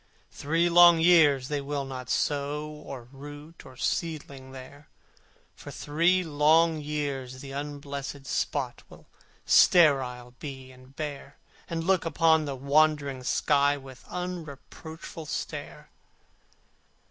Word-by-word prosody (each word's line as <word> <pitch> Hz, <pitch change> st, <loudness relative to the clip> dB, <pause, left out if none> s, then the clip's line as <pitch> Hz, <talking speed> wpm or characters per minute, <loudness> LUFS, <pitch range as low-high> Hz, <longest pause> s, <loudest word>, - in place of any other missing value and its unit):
For -, -, -24 dB
three 165 Hz, +4 st, +1 dB
long 175 Hz, -1 st, +7 dB
years 155 Hz, -6 st, +5 dB
they 145 Hz, -1 st, -2 dB
will 140 Hz, 0 st, -3 dB
not 130 Hz, -2 st, -7 dB
sow 145 Hz, +1 st, -1 dB
Or 140 Hz, -5 st, -9 dB
root 145 Hz, +4 st, -11 dB
or 130 Hz, -1 st, -14 dB
seedling 140 Hz, -4 st, -3 dB
there: 135 Hz, +3 st, -12 dB, 0.7 s
For -, -, -11 dB
three 170 Hz, +5 st, +1 dB
long 160 Hz, +1 st, +3 dB
years 140 Hz, -4 st, -4 dB
the 135 Hz, -, -9 dB
unblessed 140 Hz, -1 st, -6 dB
spot -, -, -2 dB
Will -, -, -16 dB, 0.4 s
sterile 130 Hz, -7 st, +4 dB
be 130 Hz, -3 st, -8 dB
and 130 Hz, +1 st, -18 dB
bare, 145 Hz, -2 st, -6 dB, 0.3 s
And 165 Hz, -1 st, -3 dB
look 185 Hz, 0 st, +2 dB
upon 160 Hz, -1 st, +3 dB
the 140 Hz, -2 st, -4 dB
wondering 140 Hz, 0 st, +1 dB
sky 145 Hz, +2 st, +2 dB
With 135 Hz, -2 st, -13 dB
unreproachful 160 Hz, -2 st, -8 dB
stare. -, -, -6 dB
145 Hz, 120 wpm, -27 LUFS, 135-160 Hz, 0.7 s, long